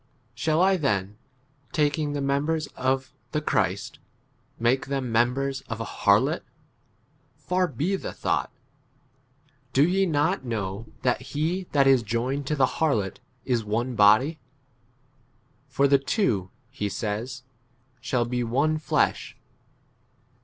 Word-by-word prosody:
Shall 155 +8 +1
I 190 0 +4
then, 105 - -1 0.5
taking 150 -1 +1
the 145 - -2
members 145 +3 0
of 130 0 -1 0.2
the 150 - +2
Christ, 105 - -1 0.6
make 120 +4 +1
[them] 135 -3 -2
members 130 +4 +1
of 115 -1 -4
a 115 - -3
16 - - -9
harlot? - - +4 1.0
Far 180 0 0
be 160 +7 -1
the - - -6
thought. - - -1 1.2
Do 140 +4 +5
ye 190 +2 +2
not 145 -4 +1
know 110 -3 -4 0.2
that 125 -1 +1
he 170 +5 -2
[that 140 -2 +4
is] 135 -2 +5
joined 125 +5 -2
to 150 - 0
the 135 -3 +4 0.2
harlot 110 -12 +1 0.3
is 120 -3 +1
one 115 +4 -1
body? 110 +9 +4 1.3
for 140 +1 +2
the 140 0 +5
two, 125 - 0 0.2
he 105 -7 -3
says, 115 +6 -4 0.6
shall 120 -1 0
be 125 +1 -1
one 140 +7 +1
fiesh. 155 - 0
135 Hz, 130 wpm, -26 LUFS, 115-150 Hz, 1.3 s, Do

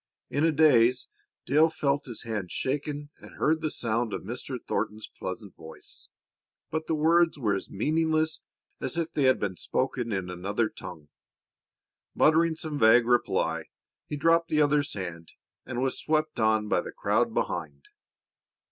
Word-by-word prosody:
In 145 +3 0
a 165 - +4
daze 130 -5 +4 0.4
Dale 155 +5 +4
felt 145 -3 -1
his 120 -4 -7
hand 105 -6 -4
shaken 145 +2 -3
and - - -14
heard 160 +1 +1
the 155 - 0
sound 115 -3 -1
of - - -4
Mr. 125 +2 -5
Thornton's 110 +1 -2
pleasant 100 +1 -7
voice, 80 0 -12 0.6
but 160 0 -3
the 160 - +1
words 165 +2 +3
were 110 -7 0
as 95 - -4
meaningless 155 +6 0 0.4
as - - -3
if 165 -1 -1
they 145 - +1
had 130 0 +4
been 95 -3 -3
spoken 125 -3 -2
in 95 -3 -2
another 100 +5 -1
tongue. 80 -4 -10 1.1
Muttering 160 +1 +4
some 155 -2 -5
vague 115 +1 +6
reply, 95 -9 +1 0.4
he 150 - -4
dropped 165 +3 +3
the 155 - +2
other's 145 -1 +2
hand 85 -4 -6 0.3
and 120 +1 -2
was 135 - -1
swept 155 -1 0
on 110 -1 +2
by - - +2
the - - -8
crowd - - +1
behind. 75 -5 -3
130 Hz, 155 wpm, -27 LUFS, 105-155 Hz, 1.1 s, vague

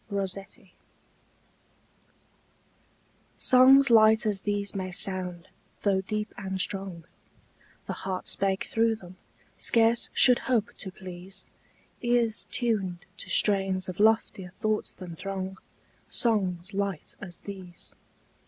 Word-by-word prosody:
ROSSETTI 195 -1 -5 2.6
SONGS 265 +1 +6
light 220 -1 +6
as 205 -3 0
these 205 -1 -1
may 185 -1 -4
sound, 180 -1 -1 0.3
though 195 -2 +2
deep 210 +2 -4
and 190 -1 -4
strong 190 -3 -3 0.8
The - - -4
heart 190 -1 -5
spake 195 0 0
through 225 0 +1
them, 185 -3 -14 0.4
scarce 230 0 +3
should 250 -2 +6
hope 240 -2 0
to 190 - -6
please 185 +1 -9 0.6
Ears 240 -2 +1
tuned 195 -7 -1
to - - -7
strains 195 -2 +4
of 185 0 -7
loftier 210 -4 +1
thoughts 215 0 -1
than 175 -3 -10
throng 190 +1 -5 0.5
Songs 195 -5 0
light 195 -4 -3
as 175 -4 -8
these. 185 -3 -8
195 Hz, 110 wpm, -27 LUFS, 185-220 Hz, 2.6 s, SONGS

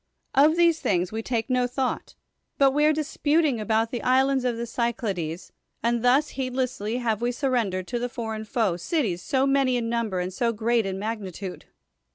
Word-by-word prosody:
Of 300 +4 +5
these 340 -2 +4
things 180 -1 0
we 220 +1 -3
take 225 -1 -2
no 250 -1 +1
thought, 255 +1 -3 0.4
but 275 -1 +5
we 295 +2 +2
are 305 - +5
dis 310 0 -3
puting 295 -4 +2
about 220 +1 +1
the 240 - -3
islands 265 +1 +2
of 240 -2 0
the 235 - -3
Cyclades, 210 -9 -3 0.3
and 235 0 +1
thus 270 +5 +4
heedlessly 255 -4 -2
have 230 -3 -1
we 240 +1 +1
surrendered 235 -9 -1
to 240 - -1
the 245 +1 -2
for 225 -2 -4
eign 215 0 -7
foe 215 -7 0
cities 195 - -1
so 265 +7 +1
many 275 -2 +2
in 230 -1 -2
number 230 -5 -1
and 180 +1 -3
so 230 +4 0
great 230 0 +1
in 190 0 -3
magnitude. 195 -3 -5
235 Hz, 195 wpm, -25 LUFS, 215-265 Hz, 0.4 s, Of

